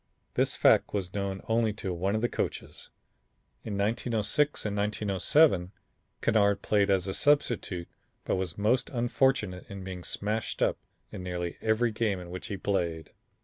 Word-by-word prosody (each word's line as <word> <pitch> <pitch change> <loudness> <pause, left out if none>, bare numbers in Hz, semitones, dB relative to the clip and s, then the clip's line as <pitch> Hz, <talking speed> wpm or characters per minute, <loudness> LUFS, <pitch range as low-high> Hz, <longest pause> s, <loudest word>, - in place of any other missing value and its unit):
This - - +1
fact - - +4
was 95 -2 -2
known 100 -1 -3
to - - -23
only 115 -2 +1
one 95 +2 -1
of 110 - 0
the 120 - +2
coaches. - - -4 0.7
In 105 -3 -4
1906 115 +7 0
and 105 -1 -1
1907, 100 - +2 0.5
Kennard 100 -2 +3
played 100 -1 +2
as 95 -2 +2
a 95 - -2
substitute 115 -11 +1 0.4
but - - +1
was 95 -3 -3
most 110 +5 +1
unfortunate 120 -6 0
in 100 -1 -7
being 95 -1 -6
smashed 105 +4 -2
up - - +1 0.3
in - - -7
nearly 90 -1 -4
every 110 +2 +2
game 105 -3 0
in 90 -1 -9
which 90 - -6
he 100 - -4
played. 85 -5 -2
100 Hz, 155 wpm, -29 LUFS, 95-110 Hz, 0.7 s, fact